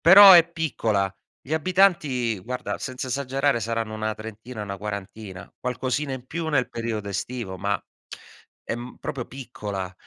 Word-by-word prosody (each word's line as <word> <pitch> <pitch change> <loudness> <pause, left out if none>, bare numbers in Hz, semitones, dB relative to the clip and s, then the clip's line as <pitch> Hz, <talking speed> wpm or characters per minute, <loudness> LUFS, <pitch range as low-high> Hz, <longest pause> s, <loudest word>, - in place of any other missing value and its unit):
però 195 +3 +11
è 170 -2 +8
piccola. 110 - 0 0.3
Gli 140 - -8
abitanti, 160 - +3
guarda, 125 +5 -4
senza 130 0 -5
esagerare 135 0 +1
saranno 115 0 -2
una 110 0 -2
trentina, 110 +1 -7
'na 100 -1 -5
quarantina, 100 -2 -7
qualcosina 130 +3 -1
in 130 -1 -6
più 165 +2 -3
nel 135 -5 +2
periodo 115 -3 -3
estivo, 100 0 -4
ma 100 +2 -1 0.8
è - - -2
m 120 +1 -8
proprio 125 -4 -4
piccola. 105 -8 -5
120 Hz, 145 wpm, -25 LUFS, 105-140 Hz, 0.8 s, però